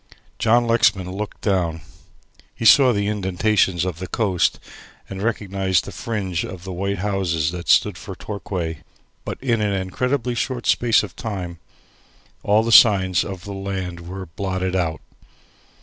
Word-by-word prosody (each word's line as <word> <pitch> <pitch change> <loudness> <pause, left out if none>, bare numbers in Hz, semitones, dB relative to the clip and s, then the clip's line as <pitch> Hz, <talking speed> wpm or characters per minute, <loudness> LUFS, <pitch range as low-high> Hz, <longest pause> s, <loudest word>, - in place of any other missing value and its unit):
John 120 +2 +3
Lexman 105 -5 +2
looked 105 +2 -6
down. 85 -5 0 0.7
He - - -5
saw 130 +2 +7
the 100 -3 0
indentations 95 -2 +1
of 90 -3 -4
the 95 - -5
coast 95 -5 0 0.5
and 95 0 -7
recognized 100 -4 0
the - - -7
fringe 95 -7 -3
of 95 -1 -8
white 100 +2 -3
houses 90 -5 0
that 85 -1 -7
stood - - +4
for - - -8
Torquay, 90 -6 -5 0.5
but - - -4
in 115 -4 +1
an 105 -1 0
incredibly 125 +7 -1
short 120 +1 -3
space 115 -2 +3
of 100 - -8
time 90 -6 -5 0.8
all 110 +3 +2
signs 95 -5 +6
of 95 -3 -7
the 100 - -7
land 95 -3 -4
were 95 +2 -7
blotted 95 +2 -3
out. 80 -4 -1
95 Hz, 145 wpm, -22 LUFS, 90-105 Hz, 0.8 s, saw